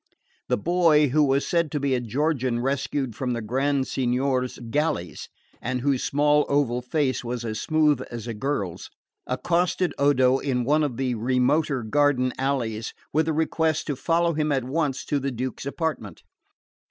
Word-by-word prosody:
The -, -, +2 dB
boy, 160 Hz, -, +3 dB
who 150 Hz, +4 st, +3 dB
was 140 Hz, 0 st, +2 dB
said 170 Hz, -2 st, +1 dB
to 145 Hz, -, 0 dB
be 140 Hz, -1 st, 0 dB
a 125 Hz, -, +2 dB
Georgian 130 Hz, 0 st, 0 dB
rescued 135 Hz, -1 st, -2 dB
from 125 Hz, 0 st, -2 dB
the 120 Hz, -, -2 dB
Grand 135 Hz, +4 st, 0 dB
Signior's 130 Hz, 0 st, 0 dB
galleys, 150 Hz, -, -2 dB, 0.3 s
and 125 Hz, 0 st, -2 dB
whose 135 Hz, -1 st, +1 dB
small 150 Hz, +1 st, +2 dB
oval 135 Hz, -4 st, +1 dB
face 130 Hz, +1 st, -1 dB
was 120 Hz, 0 st, -4 dB
as 110 Hz, -1 st, -3 dB
smooth 155 Hz, -4 st, +2 dB
as 115 Hz, -2 st, -6 dB
a 115 Hz, -, -4 dB
girl's, 105 Hz, -6 st, -3 dB, 0.4 s
accosted 175 Hz, +6 st, 0 dB
Odo 135 Hz, -2 st, +4 dB
in 125 Hz, -3 st, -1 dB
one 150 Hz, +5 st, +2 dB
of 140 Hz, -6 st, -1 dB
the 130 Hz, -2 st, 0 dB
remoter 125 Hz, +4 st, +1 dB
garden 130 Hz, +1 st, +2 dB
alleys 120 Hz, -5 st, -2 dB, 0.2 s
with 155 Hz, +2 st, +2 dB
the 160 Hz, -, +1 dB
request 160 Hz, 0 st, 0 dB
to 145 Hz, -, -2 dB
follow 170 Hz, +5 st, +1 dB
him 155 Hz, -1 st, 0 dB
at 135 Hz, -3 st, +1 dB
once 140 Hz, +1 st, -1 dB
to 145 Hz, -, 0 dB
the 140 Hz, 0 st, -2 dB
Duke's 130 Hz, +1 st, -4 dB
apartment. 160 Hz, +2 st, -4 dB
135 Hz, 165 wpm, -25 LUFS, 125-150 Hz, 0.4 s, Odo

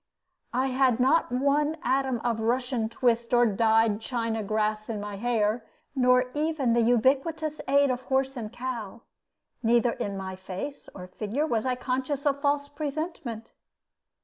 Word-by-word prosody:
I 260 Hz, +1 st, +1 dB
had 255 Hz, -2 st, +2 dB
not 265 Hz, +3 st, +3 dB
one 285 Hz, +4 st, +1 dB
atom 260 Hz, -1 st, +1 dB
of 235 Hz, -2 st, 0 dB
Russian 240 Hz, 0 st, 0 dB
twist 235 Hz, 0 st, +1 dB
or 240 Hz, 0 st, +5 dB
dyed 220 Hz, 0 st, +3 dB
China 230 Hz, -2 st, -2 dB
grass 215 Hz, +1 st, -1 dB
in 220 Hz, -2 st, -3 dB
my 205 Hz, -1 st, -6 dB
hair, 225 Hz, 0 st, 0 dB, 0.3 s
nor 250 Hz, -1 st, +3 dB
even 295 Hz, -5 st, 0 dB
the 235 Hz, -, +3 dB
ubiquitous 275 Hz, +7 st, +1 dB
aid 280 Hz, -1 st, +4 dB
of 250 Hz, 0 st, -2 dB
horse 265 Hz, 0 st, 0 dB
and 220 Hz, -4 st, -5 dB
cow; 235 Hz, -4 st, -6 dB, 0.6 s
neither 235 Hz, +1 st, +3 dB
in 200 Hz, -3 st, -4 dB
my 190 Hz, -1 st, -5 dB
face 190 Hz, +10 st, -7 dB
or 180 Hz, -, -7 dB
figure 215 Hz, +10 st, -2 dB
was 235 Hz, -4 st, -1 dB
I 255 Hz, -, +1 dB
conscious 260 Hz, +3 st, -2 dB
of 280 Hz, -1 st, +1 dB
false 285 Hz, 0 st, +1 dB
presentment. 285 Hz, -6 st, -5 dB
245 Hz, 150 wpm, -27 LUFS, 225-275 Hz, 0.6 s, or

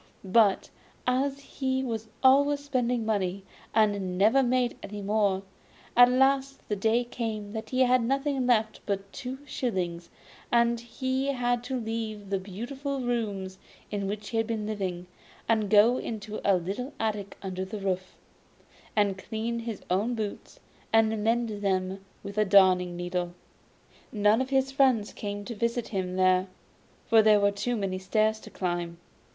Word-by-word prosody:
But 200 Hz, 0 st, +3 dB, 0.3 s
as 270 Hz, +2 st, +1 dB
he 265 Hz, -1 st, -2 dB
was 225 Hz, -3 st, -3 dB, 0.2 s
always 285 Hz, +2 st, +5 dB
spending 250 Hz, -5 st, 0 dB
money, 195 Hz, -3 st, -1 dB, 0.3 s
and 200 Hz, -4 st, +1 dB
never 220 Hz, +8 st, +5 dB
made 250 Hz, -1 st, +1 dB
any 205 Hz, 0 st, -7 dB
more, 200 Hz, -2 st, +1 dB, 0.5 s
at 245 Hz, 0 st, +8 dB
last 270 Hz, +1 st, +2 dB
the 210 Hz, -, -1 dB
day 225 Hz, +4 st, +2 dB
came 220 Hz, -4 st, -4 dB
when 220 Hz, -1 st, -3 dB
he 255 Hz, +2 st, 0 dB
had 255 Hz, 0 st, +4 dB
nothing 270 Hz, +1 st, 0 dB
left 220 Hz, -3 st, +2 dB
but 200 Hz, -1 st, -3 dB
two 260 Hz, -1 st, -5 dB
shillings, 180 Hz, -11 st, -3 dB, 0.4 s
and 235 Hz, 0 st, +3 dB
he 260 Hz, +3 st, -2 dB
had 245 Hz, -3 st, 0 dB
to 260 Hz, 0 st, -2 dB
leave 220 Hz, -3 st, -4 dB
the 195 Hz, -, +1 dB
beautiful 260 Hz, +9 st, -5 dB
rooms 205 Hz, -6 st, -2 dB, 0.3 s
in 200 Hz, -1 st, -2 dB
which 210 Hz, +1 st, -4 dB
he 230 Hz, -, -2 dB
had 225 Hz, -1 st, +1 dB
been 220 Hz, -2 st, -2 dB
living, 190 Hz, -4 st, -3 dB, 0.4 s
and 220 Hz, -3 st, +2 dB
go 220 Hz, +4 st, +6 dB
into 215 Hz, -1 st, -5 dB
a 200 Hz, -, +4 dB
little 205 Hz, -, -4 dB
attic 210 Hz, -3 st, -2 dB
under 185 Hz, -1 st, -3 dB
the 190 Hz, +3 st, -6 dB
roof, 185 Hz, -2 st, -3 dB, 0.8 s
and 200 Hz, -3 st, +2 dB
clean 225 Hz, +3 st, -3 dB
his 230 Hz, -3 st, -6 dB
own 215 Hz, +7 st, +1 dB
boots, 215 Hz, -2 st, -5 dB, 0.3 s
and 220 Hz, -1 st, +3 dB
mend 225 Hz, -2 st, 0 dB
them 190 Hz, -1 st, -1 dB, 0.2 s
with 200 Hz, +1 st, -4 dB
a -, -, +5 dB
darning 185 Hz, -3 st, +5 dB
needle. 175 Hz, 0 st, -3 dB, 0.8 s
None 210 Hz, +2 st, +3 dB
of 260 Hz, -, -3 dB
his 270 Hz, 0 st, +1 dB
friends 260 Hz, -6 st, +2 dB
came 205 Hz, -1 st, -5 dB
to 235 Hz, -, -5 dB
visit 235 Hz, +1 st, -1 dB
him 185 Hz, -3 st, -2 dB
there, 185 Hz, 0 st, +3 dB, 0.6 s
for 225 Hz, -1 st, +6 dB
there 215 Hz, -1 st, +5 dB
were 200 Hz, 0 st, +3 dB
too 240 Hz, +5 st, -2 dB
many 195 Hz, -3 st, -2 dB
stairs 215 Hz, +3 st, +1 dB
to -, -, -12 dB
climb. 175 Hz, -2 st, -3 dB
220 Hz, 155 wpm, -28 LUFS, 195-245 Hz, 0.8 s, at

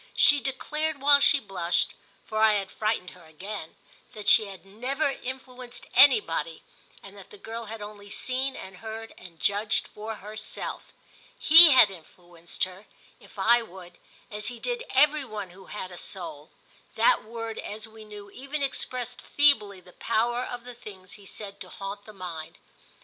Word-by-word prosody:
She 290 Hz, -1 st, +6 dB
declared 300 Hz, +3 st, -2 dB
while 285 Hz, +1 st, +6 dB
she 285 Hz, +1 st, +5 dB
blushed—for 195 Hz, +2 st, -3 dB
I 220 Hz, -1 st, +6 dB
had 195 Hz, -2 st, -2 dB
frightened 215 Hz, -4 st, -2 dB
her 180 Hz, -2 st, -16 dB
again—that 195 Hz, +4 st, -10 dB
she 220 Hz, -, +7 dB
had 195 Hz, -1 st, -11 dB
never 260 Hz, +9 st, -2 dB
influenced 255 Hz, -1 st, -8 dB
anybody 475 Hz, +2 st, +4 dB, 0.4 s
and -, -, -12 dB
that -, -, -13 dB
the 425 Hz, -, -13 dB
girl 230 Hz, -, -7 dB
had 220 Hz, 0 st, -7 dB
only 205 Hz, -1 st, -10 dB
seen 260 Hz, +5 st, -1 dB
and 190 Hz, -1 st, -9 dB
heard 225 Hz, +2 st, -8 dB
and 170 Hz, -3 st, -14 dB
judged 205 Hz, +2 st, +1 dB
for 220 Hz, +1 st, -7 dB
herself. 215 Hz, +1 st, -6 dB, 0.5 s
He 325 Hz, -1 st, +9 dB
had 235 Hz, -6 st, +7 dB
influenced 175 Hz, -1 st, -8 dB
her, 185 Hz, +2 st, -5 dB, 0.3 s
if -, -, -18 dB
I 235 Hz, +1 st, +4 dB
would, 185 Hz, -5 st, -12 dB, 0.3 s
as 210 Hz, 0 st, -3 dB
he 245 Hz, -1 st, -5 dB
did 485 Hz, 0 st, -3 dB
every 300 Hz, 0 st, +4 dB
one 210 Hz, -7 st, -7 dB
who 190 Hz, +1 st, -15 dB
had 185 Hz, -3 st, -6 dB
a 175 Hz, -, -9 dB
soul: 160 Hz, -5 st, -7 dB, 0.5 s
that -, -, +4 dB
word, 225 Hz, 0 st, -6 dB
as 215 Hz, +1 st, -6 dB
we 220 Hz, 0 st, -13 dB
knew, 205 Hz, -1 st, -11 dB
even 275 Hz, +5 st, -4 dB
expressed 250 Hz, -2 st, -3 dB
feebly 210 Hz, -10 st, +3 dB
the 180 Hz, 0 st, -18 dB
power 240 Hz, +2 st, 0 dB
of 245 Hz, -1 st, -6 dB
the 250 Hz, 0 st, -9 dB
things 195 Hz, -6 st, -12 dB
he 200 Hz, -2 st, -14 dB
said 200 Hz, 0 st, -8 dB
to -, -, -6 dB
haunt 200 Hz, +1 st, -7 dB
the 215 Hz, -, -11 dB
mind. 170 Hz, -5 st, -8 dB
215 Hz, 165 wpm, -27 LUFS, 195-255 Hz, 0.5 s, He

